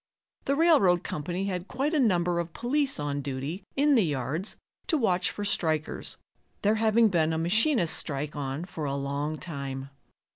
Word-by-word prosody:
The 275 - +2
railroad 280 - +4
company 175 +5 -3
had 185 -1 -3
quite 275 +5 -1
a 310 - +3
number 175 -7 +2
of 170 -1 -4
police 275 - 0
on 145 -1 -2
duty 140 +6 -4
in 290 +1 +4
the 240 - +5
yards 155 - -2 0.3
to 330 -4 +2
watch 185 -8 +1
for 205 - -5
strikers, 160 -6 -1 0.5
there 205 +1 +4
having 225 0 +4
been 165 -3 +2
a - - 0
machinists' 205 - +3
strike 145 0 -4
on 140 +3 -3
for 160 -4 -5
a 140 -1 -1
long 140 +2 -2
time. 140 -5 -6
175 Hz, 170 wpm, -28 LUFS, 145-220 Hz, 0.5 s, the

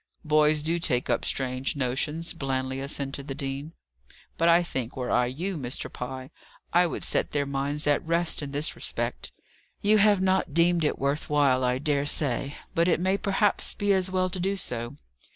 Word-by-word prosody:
"Boys 150 0 +3
do 165 +2 0
take 125 -7 0
up - - 0
strange 130 +1 0
notions," 145 +5 -1
blandly 130 -3 -2
assented 140 0 -2
the 135 - -4
dean. 140 +2 -5 0.6
"But, 165 +1 +2
I 170 +1 +5
think, 130 -8 -4
were 125 -1 -3
I 125 0 +3
you, 170 +7 -3
Mr. 125 -2 -3
Pye, 130 +2 -6 0.4
I 175 +1 +5
would - - -5
set - - 0
their 145 -1 +1
minds 140 +2 -2
at 145 -1 +2
rest 170 0 +1
in 140 -1 -5
this 145 +2 0
respect. - - -3 0.5
You 210 +1 +5
have 205 -1 +5
not 190 0 +2
yet - - -15
deemed 170 0 +3
it 150 - 0
worth 140 +2 -2
while, 140 -3 +3
I 125 0 +1
dare 145 0 0
say: 140 -1 0 0.2
but 170 +1 +2
it 170 - +2
may 190 +2 +1
perhaps 200 +1 +1
be 205 -1 +2
as 190 -1 +2
well 185 -1 0
to 185 - -3
do 195 +2 -1
so. 120 -8 -4
150 Hz, 190 wpm, -26 LUFS, 135-175 Hz, 0.6 s, I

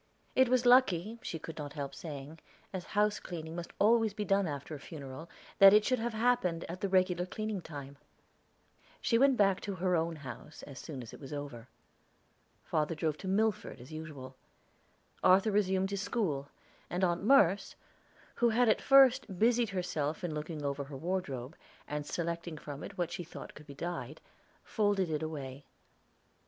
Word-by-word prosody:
It 260 -1 +5
was 250 -1 +3
lucky, 230 -4 +4
she 165 - -4
could 160 0 -8
not 145 -1 -6
help 140 -2 -5
saying, 150 0 -8 0.3
as 185 -2 -4
house 210 0 +3
cleaning 160 -2 -7
must 175 -1 -6
always 220 0 +3
be 210 -1 -3
after 160 -7 0
a 150 - -6
funeral, 145 +2 -9 0.3
that 195 0 +10
it 210 0 +5
should 255 -2 +2
have 230 0 -2
happened 220 -8 +1
at 175 +2 -7
the 200 - 0
regular 185 -1 +2
cleaning 215 0 -3
time. 140 -3 -9 1.0
She 230 - +2
went 270 -1 +5
back 195 -2 +3
to 200 -2 -4
her 180 0 +1
own 165 0 0
house 145 0 -9
as 140 -3 -9
soon 140 -6 -7
as 115 - -11
it - - -10
was 135 -1 -10
over. 145 -5 -6 1.0
Father 155 +1 0
drove 155 -1 -1
to 190 - -6
Milford 210 -5 0
as 125 +4 -12
usual; 145 -5 -8 0.9
Arthur 195 +4 +5
resumed 190 -1 +1
his 200 -1 -2
school, 160 -12 -1 0.4
and 180 +2 -2
Aunt 175 -1 +2
Merce, 205 -6 +4 0.6
who 240 - +3
had 240 +2 +3
at 215 - +3
first 265 -7 +5
busied 235 +2 +3
herself 165 -5 -2
in 170 -3 -2
looking 150 0 -5
over 140 0 -2
her 135 -1 -8
wardrobe, 155 -5 -3 0.3
and 150 0 -4
selecting 170 -1 -3
from 145 -1 -7
it - - -9
what 175 -2 -1
she 175 +1 -4
thought 170 - -10
could 150 +1 -14
be 140 - -10
dyed, 160 -3 -5 0.4
folded 205 -5 +1
it 155 0 -1
away. 140 -3 -5
175 Hz, 175 wpm, -32 LUFS, 150-205 Hz, 1.0 s, that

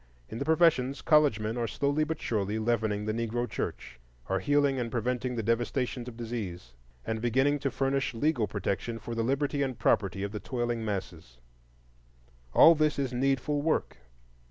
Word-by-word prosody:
In 115 - -6
the 140 - -2
professions, 155 -5 +3
college 150 -8 +4
men 110 +2 -3
are 120 -1 -1
slowly 145 +5 0
but 160 0 -3
surely 105 -1 -1
leavening 110 -2 0
the 110 - -1
Negro 115 +1 -2
church, 65 - -5 0.3
are 95 - +1
healing 145 +3 +2
and 120 -1 -2
preventing 125 +1 -1
the 115 - -2
devastations 120 +2 -1
of 120 -2 -8
disease, 100 - -5 0.3
and 110 0 -2
beginning 135 +5 +2
to 140 0 -1
furnish 135 0 -1
legal 120 -3 +1
protection 105 +3 -3
for 115 - -7
the 115 - -1
liberty 140 +4 0
and 130 -4 -1
property 95 -1 +1
of 100 - -3
the 105 - -5
toiling 120 -2 -2
masses. 90 - -5 1.1
All 165 - +8
this 155 -1 +1
is 135 -3 -1
needful 135 +3 0
work. 155 - 0
120 Hz, 170 wpm, -29 LUFS, 110-140 Hz, 1.1 s, All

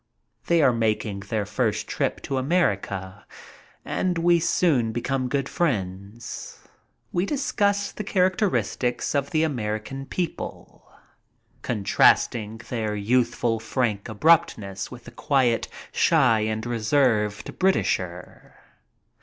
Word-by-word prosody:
They 170 -2 +4
are 130 - +5
making 110 -3 -1
their 100 +1 -3
first 110 0 -1
trip - - -2
to 135 - -2
America, 100 - -1 0.6
and 180 -2 -1
we 170 0 +4
soon 145 -8 +2
become 130 +2 -2
good 135 0 -1
friends. 105 - -3 0.5
We 175 +3 0
discuss 205 -7 0
the 210 - -6
characteristics 185 - 0
of 140 -1 0
the 155 -1 +1
American 130 -1 -3
people, 175 -3 -5 0.7
contrasting 110 0 +2
their 110 -3 -2
youthful, 115 +1 +1
frank 110 -2 -2
abruptness 110 - +2
with 125 -1 -11
the - - -11
quiet, 130 -5 +1 0.2
shy, 110 -1 +4
and 110 +1 -2
reserved 110 -3 0
Britisher. 90 - -1
120 Hz, 105 wpm, -24 LUFS, 105-155 Hz, 0.7 s, are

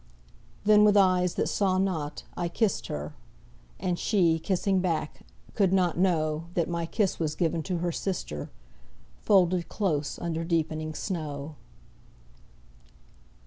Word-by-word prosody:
Then, 210 0 +6
with 210 -1 +5
eyes 185 -2 +3
that - - 0
saw 190 -2 +1
not, 165 -6 -2
I 175 - -1
kissed 170 - 0
her: 75 +1 -5 0.7
And 180 -1 -1
she, 170 -6 +2
kissing 190 +2 +1
back, 165 -4 -2 0.3
could 195 -4 +2
not 180 -3 +2
know 160 -3 +1
That 170 -2 +1
my 170 -1 -2
kiss 200 +1 0
was 155 -2 -1
given 165 0 0
to 180 +2 -2
her 175 +1 -1
sister, 165 - -4 0.7
Folded 180 -3 +3
close 155 -8 -1
under 165 -1 -3
deepening 155 -2 -1
snow. 155 -5 -4
175 Hz, 130 wpm, -27 LUFS, 155-190 Hz, 0.7 s, Then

